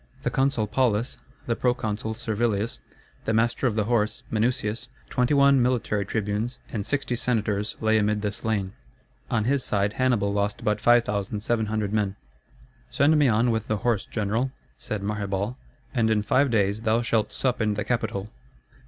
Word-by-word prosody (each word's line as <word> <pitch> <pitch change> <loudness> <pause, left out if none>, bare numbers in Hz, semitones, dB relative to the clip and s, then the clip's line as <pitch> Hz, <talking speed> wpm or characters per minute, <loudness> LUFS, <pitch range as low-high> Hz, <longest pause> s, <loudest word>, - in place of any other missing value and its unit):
The - - 0
consul 135 -5 +1
Paulus, 120 +1 0 0.3
the 115 - 0
proconsul 110 -3 -1
Servilius, 110 -1 -1 0.5
the 110 - +1
master 120 +3 +2
of 110 - -1
the 110 - +2
horse 105 -1 0
Minucius, 110 -1 0 0.2
21 140 +1 +4
military 115 -5 0
tribunes, 110 +3 -2 0.2
and 105 -4 -3
60 140 -3 0
senators 105 -4 0
lay 110 0 +3
amid 105 0 0
the 105 - 0
slain. 100 -3 -2 0.6
On 115 -3 +1
his 135 +3 +1
side 100 0 0
Hannibal 115 -6 +1
lost 100 0 -1
but 105 0 0
5,700 110 -1 +1
men. 100 -2 0 0.7
"Send 145 - +3
me 150 -2 +4
on 115 +1 +3
with 110 -1 -1
the 110 - 0
horse, 110 -1 0
general," 115 +4 -1 0.3
said 105 -2 -4
Maherbal, 100 +2 -2 0.4
"and 115 -2 +2
in 105 -1 +2
five 135 +6 +3
days 105 -2 +1
thou 115 +1 +2
shalt 110 -2 +1
sup 125 -2 -1
in 105 -1 +1
the 105 - -2
Capitol." 110 -4 -1
110 Hz, 155 wpm, -25 LUFS, 105-120 Hz, 0.7 s, 21